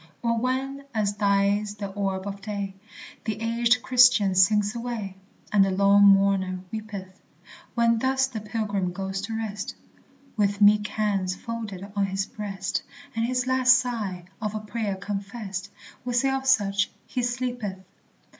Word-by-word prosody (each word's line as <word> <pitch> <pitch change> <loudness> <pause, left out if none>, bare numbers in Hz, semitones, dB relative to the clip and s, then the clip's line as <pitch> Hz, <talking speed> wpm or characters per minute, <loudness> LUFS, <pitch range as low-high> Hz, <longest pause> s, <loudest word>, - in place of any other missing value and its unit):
Or 230 0 +2
when, 270 +3 -2
as 205 -2 +1
dies 205 0 +1
the 200 -1 -5
orb 195 -1 -2
of 200 0 -6
day, 200 -2 -4 0.5
The 215 -2 -2
aged 235 +2 +2
Christian 245 -6 +5
sinks 205 +3 +4
away, 230 -5 -4 0.4
And 205 -2 +5
the 195 - +2
lone 200 +1 +5
mourner 195 -2 +3
weepeth; 200 -4 -7 0.5
When 230 -1 +3
thus 265 +2 +2
the 240 -5 -6
pilgrim 205 -4 -2
goes 190 +1 -3
to 220 +2 -4
rest, 210 -2 -4 0.6
With 205 -2 +1
meek 210 0 +5
hands 200 -4 -1
folded 205 -4 -6
on 200 -1 +1
his 195 0 -1
breast, 195 -3 -4 0.3
And 225 0 +1
his 250 0 0
last 260 0 +5
sigh 215 -8 -3 0.2
a 215 - 0
prayer 215 -2 -3
confessed 200 0 -5 0.3
We 245 -1 -2
say 270 +2 +3
of 270 0 -2
such, 205 -6 +3 0.2
"He 250 - -2
sleepeth." 245 -5 -2
210 Hz, 145 wpm, -26 LUFS, 195-235 Hz, 0.6 s, Christian